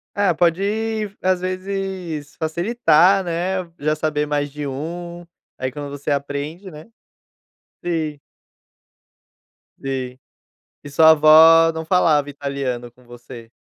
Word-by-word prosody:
É, 200 Hz, -4 st, +2 dB
pode 205 Hz, +5 st, -1 dB
às 185 Hz, -1 st, +1 dB
vezes 185 Hz, -4 st, -5 dB
facilitar, 180 Hz, +2 st, +2 dB
né, 180 Hz, +2 st, -2 dB, 0.2 s
já 155 Hz, +1 st, 0 dB
saber 150 Hz, -1 st, -1 dB
mais 145 Hz, -1 st, -2 dB
de 145 Hz, +1 st, -6 dB
um, 170 Hz, +5 st, -6 dB, 0.3 s
aí 130 Hz, 0 st, -3 dB
quando 145 Hz, +1 st, -7 dB
você 145 Hz, +1 st, -5 dB
aprende, 145 Hz, +6 st, -4 dB
né. 155 Hz, -3 st, -12 dB, 1.0 s
Sim. 155 Hz, -4 st, -2 dB, 1.6 s
Sim. 130 Hz, -2 st, -5 dB, 0.7 s
E 145 Hz, -, -9 dB
sua 160 Hz, +3 st, +6 dB
avó 160 Hz, +1 st, +7 dB
não 160 Hz, 0 st, -5 dB
falava 155 Hz, -5 st, +2 dB
italiano 140 Hz, -4 st, -4 dB
com 125 Hz, +1 st, -24 dB
você? 120 Hz, -1 st, -12 dB
155 Hz, 115 wpm, -20 LUFS, 145-180 Hz, 1.6 s, avó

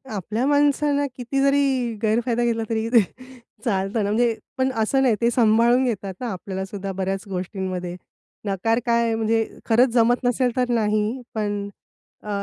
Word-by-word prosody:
आपल्या 215 Hz, +6 st, -2 dB
माणसांना 290 Hz, 0 st, +2 dB
किती 265 Hz, +2 st, -2 dB
जरी 275 Hz, -4 st, +2 dB
गैरफायदा 235 Hz, +2 st, +1 dB
घेतला 230 Hz, -1 st, 0 dB
तरी 225 Hz, 0 st, -1 dB, 0.8 s
चालतं 200 Hz, 0 st, 0 dB
ना, 200 Hz, -, -1 dB
म्हणजे 230 Hz, +1 st, +2 dB, 0.2 s
पण 260 Hz, 0 st, +1 dB
असं 230 Hz, +3 st, +1 dB
नाही, 245 Hz, -5 st, +3 dB
ते 235 Hz, -, +4 dB
सांभाळून 235 Hz, +2 st, +4 dB
घेतात 200 Hz, -6 st, -2 dB
ना, 250 Hz, -, -4 dB
आपल्यालासुद्धा 190 Hz, +1 st, -5 dB
बऱ्याच 190 Hz, +1 st, -3 dB
गोष्टींमध्ये. 185 Hz, -1 st, -4 dB, 0.5 s
नकार 215 Hz, +4 st, 0 dB
काय, 235 Hz, -1 st, +2 dB
म्हणजे 225 Hz, 0 st, +1 dB, 0.2 s
खरंच 245 Hz, +3 st, +4 dB
जमत 240 Hz, +1 st, +3 dB
नसेल 245 Hz, 0 st, +1 dB
तर 250 Hz, -1 st, +1 dB
नाही. 215 Hz, +2 st, 0 dB
पण 205 Hz, -1 st, -2 dB, 0.5 s
अ, 210 Hz, -, -8 dB
225 Hz, 145 wpm, -23 LUFS, 205-245 Hz, 0.8 s, ते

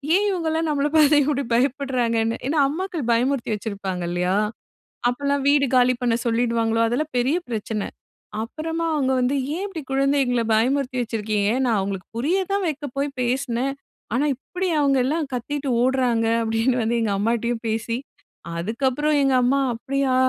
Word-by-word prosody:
ஏன் 405 Hz, +2 st, +3 dB
இவுங்கல்லாம் 325 Hz, -3 st, -1 dB
நம்மள 290 Hz, -1 st, +1 dB
பார்த்து 300 Hz, -1 st, +6 dB
இப்பிடி 280 Hz, 0 st, 0 dB
பயப்படுறாங்கன்னு. 240 Hz, -3 st, +1 dB
ஏன்னா, 300 Hz, +2 st, +1 dB
அம்மாக்கள் 335 Hz, -2 st, -3 dB
பயமுறுத்தி 250 Hz, +2 st, +1 dB
வச்சிருப்பாங்க 195 Hz, -4 st, -4 dB
இல்லயா! 180 Hz, +2 st, 0 dB, 0.7 s
அப்பல்லாம் 280 Hz, +3 st, 0 dB
வீடு 285 Hz, -1 st, +4 dB
காலி 250 Hz, 0 st, +5 dB
பண்ண 240 Hz, -2 st, +2 dB
சொல்லிடுவாங்களோ! 230 Hz, -1 st, +1 dB
அதெல்லாம் 285 Hz, +6 st, -2 dB
பெரிய 260 Hz, +6 st, +2 dB
பிரச்சனை. 220 Hz, -2 st, -3 dB, 0.6 s
அப்பறமா 325 Hz, +7 st, -4 dB
அவுங்க 265 Hz, -3 st, +1 dB
வந்து 250 Hz, +2 st, +1 dB, 0.2 s
"ஏன் 370 Hz, +4 st, -3 dB
இப்பிடி 365 Hz, -6 st, -6 dB
குழந்தைகள 270 Hz, -3 st, +2 dB
பயமுறுத்தி 255 Hz, +3 st, +1 dB
வச்சிருக்கீங்க. 215 Hz, -3 st, -1 dB, 0.2 s
நான் 230 Hz, -3 st, +2 dB
அவுங்களுக்கு 195 Hz, -1 st, -4 dB
புரிய 315 Hz, +10 st, +1 dB
தான் 400 Hz, -1 st, +1 dB
வைக்க 295 Hz, -1 st, -4 dB
போய் 280 Hz, +1 st, 0 dB
பேசினேன். 255 Hz, +1 st, -1 dB, 0.4 s
ஆனா 260 Hz, +5 st, +2 dB
இப்பிடி 360 Hz, +8 st, -4 dB
அவுங்க 275 Hz, -2 st, +3 dB
எல்லாம் 300 Hz, +2 st, -1 dB
கத்திட்டு 280 Hz, +4 st, -3 dB
ஓடுறாங்க" 250 Hz, -3 st, +2 dB, 0.2 s
அப்பிடின்னு 225 Hz, +3 st, +1 dB
வந்து 230 Hz, +2 st, 0 dB
எங்க 210 Hz, -3 st, 0 dB
அம்மாட்டயும் 235 Hz, +2 st, 0 dB
பேசி, 225 Hz, +1 st, -1 dB, 0.6 s
அதுக்கப்புறம் 260 Hz, -, 0 dB
எங்க 270 Hz, -1 st, +3 dB
அம்மா 265 Hz, +3 st, +3 dB
"அப்பிடியா! 270 Hz, +2 st, -1 dB
255 Hz, 145 wpm, -23 LUFS, 230-285 Hz, 0.7 s, பார்த்து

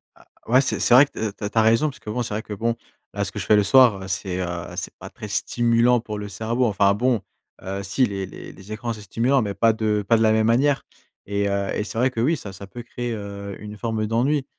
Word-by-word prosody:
Ah -, -, -22 dB, 0.2 s
ouais, 125 Hz, +4 st, +5 dB
c'est 135 Hz, -, -1 dB
c'est -, -, +3 dB
vrai 135 Hz, +4 st, +9 dB
que -, -, -28 dB, 0.2 s
tu 105 Hz, -, -12 dB
as 105 Hz, -, -1 dB
tu 115 Hz, -, -7 dB
as -, -, +7 dB
raison 115 Hz, +7 st, +3 dB
puisque, 130 Hz, -5 st, -10 dB
bon, 120 Hz, +4 st, -2 dB
c'est 115 Hz, -, -4 dB
vrai 110 Hz, +1 st, -3 dB
que, 105 Hz, -, -7 dB
bon, 115 Hz, +3 st, -1 dB, 0.4 s
là, 100 Hz, -, -1 dB
ce 100 Hz, -, -5 dB
que 105 Hz, -, -6 dB
je 95 Hz, -, -4 dB
fais 105 Hz, -, +5 dB
le 105 Hz, -, +4 dB
soir, 100 Hz, -3 st, +5 dB
c'est, 95 Hz, -1 st, -2 dB
heu, 90 Hz, -, -2 dB, 0.3 s
c'est -, -, -5 dB
pas -, -, -9 dB
très -, -, -9 dB
stimulant 120 Hz, 0 st, +2 dB
pour 105 Hz, -2 st, -6 dB
le 105 Hz, -, -5 dB
cerveau. 115 Hz, +5 st, -1 dB
Enfin 100 Hz, -2 st, +3 dB
bon, 120 Hz, 0 st, +1 dB, 0.4 s
heu, 95 Hz, +1 st, -4 dB
si 115 Hz, +7 st, +2 dB
les 100 Hz, -3 st, -3 dB
les -, -, -10 dB
les 95 Hz, +2 st, -13 dB
écrans, 115 Hz, +2 st, -3 dB
c'est 105 Hz, -, -10 dB
stimulant, 120 Hz, +7 st, +1 dB
mais 100 Hz, -3 st, -2 dB
pas 115 Hz, -1 st, +4 dB
de 105 Hz, -1 st, 0 dB
pas 115 Hz, -, +5 dB
de -, -, 0 dB
la 110 Hz, -1 st, +4 dB
même 110 Hz, 0 st, +3 dB
manière 135 Hz, +4 st, +2 dB, 0.4 s
et 100 Hz, 0 st, -1 dB
heu, 100 Hz, 0 st, -1 dB
c'est 110 Hz, -, -7 dB
vrai 130 Hz, +3 st, +2 dB
que, 115 Hz, -, -5 dB
oui, 150 Hz, +7 st, +2 dB
ça 100 Hz, -5 st, -8 dB
ça 100 Hz, +1 st, -10 dB
peut 120 Hz, +4 st, -9 dB
créer, 120 Hz, 0 st, -4 dB
heu, 100 Hz, -2 st, -6 dB
une 105 Hz, 0 st, -8 dB
forme 110 Hz, -1 st, -2 dB
d'ennui, 130 Hz, +6 st, +1 dB
110 Hz, 265 wpm, -23 LUFS, 100-120 Hz, 0.4 s, vrai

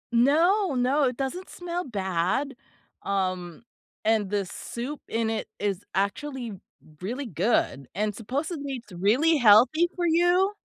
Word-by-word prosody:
No, 325 Hz, -, +4 dB
no, 260 Hz, +4 st, +2 dB
it 250 Hz, -1 st, -1 dB
doesn't 315 Hz, +8 st, -4 dB
smell 355 Hz, 0 st, -4 dB
bad, 195 Hz, +5 st, -1 dB, 0.5 s
um, 185 Hz, -1 st, -2 dB, 0.4 s
and 215 Hz, -3 st, +2 dB
the 205 Hz, -1 st, 0 dB
soup 245 Hz, +10 st, -6 dB
in 225 Hz, 0 st, -1 dB
it 220 Hz, -, -3 dB
is 200 Hz, -2 st, -2 dB
actually 235 Hz, +4 st, -2 dB, 0.5 s
really 245 Hz, +9 st, -3 dB
good 185 Hz, -, 0 dB
and 210 Hz, +1 st, 0 dB
supposedly 280 Hz, -, -4 dB
it's 230 Hz, -5 st, -8 dB
really 245 Hz, -, +3 dB
healthy 250 Hz, +9 st, +6 dB
for 350 Hz, -1 st, -1 dB
you. 350 Hz, +4 st, +3 dB
245 Hz, 130 wpm, -26 LUFS, 205-300 Hz, 0.5 s, healthy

